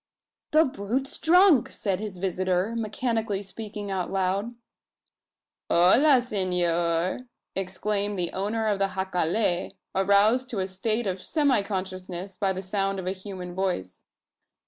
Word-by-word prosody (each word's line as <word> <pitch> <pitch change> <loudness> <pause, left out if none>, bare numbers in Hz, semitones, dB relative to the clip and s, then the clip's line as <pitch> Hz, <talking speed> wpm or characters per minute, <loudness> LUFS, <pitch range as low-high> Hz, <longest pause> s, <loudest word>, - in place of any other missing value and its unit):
"The 315 +1 +5
brute's 260 +2 -2
drunk!" 330 - +5
said 195 -3 -1
his 210 -3 -6
visitor, 185 +2 0
mechanically 225 -2 -1
speaking 205 0 -7
aloud. 195 +4 -1 1.1
"H'la 245 - +5
S'nor!" 180 0 0 0.3
exclaimed 200 +2 -1
the 175 -2 -2
owner 210 +4 -1
of 205 -2 +1
the 195 0 0
jacale, 185 0 0 0.2
aroused 205 +6 +3
to 230 - -4
a 190 - -1
state 215 +5 -1
of 185 -1 -2
semi 280 - +2
consciousness 185 -1 -5
by 190 +1 0
the 190 0 -4
sound 195 +1 -1
of 190 - -5
a 185 - 0
human 185 -2 -7
voice. 180 - -3
195 Hz, 125 wpm, -26 LUFS, 185-225 Hz, 1.1 s, The